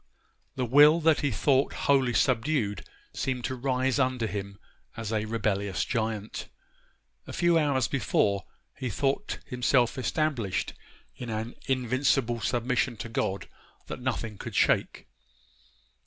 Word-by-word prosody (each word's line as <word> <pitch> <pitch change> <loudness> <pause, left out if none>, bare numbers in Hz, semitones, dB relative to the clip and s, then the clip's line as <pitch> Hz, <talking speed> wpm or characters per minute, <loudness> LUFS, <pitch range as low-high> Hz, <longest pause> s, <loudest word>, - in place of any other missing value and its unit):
The 130 - -1
will 145 +6 +7
that 160 -1 +4
he 145 - +1
thought 135 +4 +2
wholly 135 -3 +3
subdued 120 - +1 0.3
seemed 130 -2 -2
to - - -2
rise 130 0 0
under 130 -3 +1
him 100 -2 -5 0.4
as 110 -1 -4
a 110 0 0
rebellious 100 -3 -1
giant. 110 -3 -3 0.8
A - - -7
few 175 -1 +3
hours 140 -4 +2
before 100 -6 +1 0.3
he 130 -2 -4
thought 140 - -1
himself 125 0 +1
established 130 -8 -1 0.4
in 125 - -7
an 110 +2 -3
invincible 130 -1 +1
submission 125 +1 0
to 115 - -6
God 100 -3 -2 0.4
that - - -7
nothing 115 -5 -3
could - - -7
shake. - - +2
125 Hz, 125 wpm, -28 LUFS, 110-135 Hz, 0.8 s, will